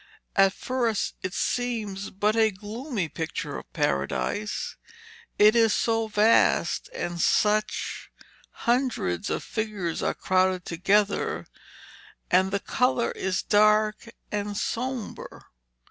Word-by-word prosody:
At 195 -1 +5
first 240 -4 -1
it 185 - -3
seems 220 -5 -2
but 210 +3 0
a 220 -1 +4
gloomy 215 - -4
picture 160 +1 -4
of - - -16
Paradise. 70 - -1 0.6
It 215 +2 +6
is 225 -2 +4
so 225 -1 +1
vast, 215 +2 +3
and 175 - -4
such 215 0 +1 0.6
hundreds 235 - 0
of - - -2
figures 210 -7 -3
are - - 0
crowded 185 -1 +1
together, 200 +4 +1 0.9
and 185 +1 +4
the 200 +1 -1
colour 250 +2 +1
is 190 -1 -2
dark 215 +2 +3 0.2
and 205 -1 -2
sombre. 245 +1 -4
210 Hz, 110 wpm, -26 LUFS, 190-225 Hz, 0.9 s, It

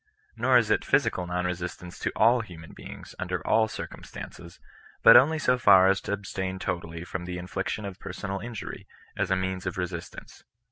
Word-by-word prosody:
Nor 130 -1 +4
is 115 -3 +2
it - - +2
physical 90 -1 +1
non 90 0 -1
resistance 90 0 -5
to - - -1
all 115 +3 +4
human 85 -7 -11
beings, - - -10
under - - -3
all 110 -1 +3
circumstances, 85 -4 -9 0.4
but - - +10
only 145 +6 +7
so 125 -5 +2
far 95 -5 +7
as 95 0 +2
to - - -5
abstain 95 -2 -4
totally 85 -3 -4
from 90 0 -5
the 90 0 -5
infliction 90 +4 -4
of 100 -1 -7
personal 100 0 -5
injury, 115 -1 -7 0.3
as - - -1
a 95 - +3
means 95 0 -2
of 90 - -3
resistance. 90 -2 -6
95 Hz, 180 wpm, -27 LUFS, 90-105 Hz, 0.4 s, but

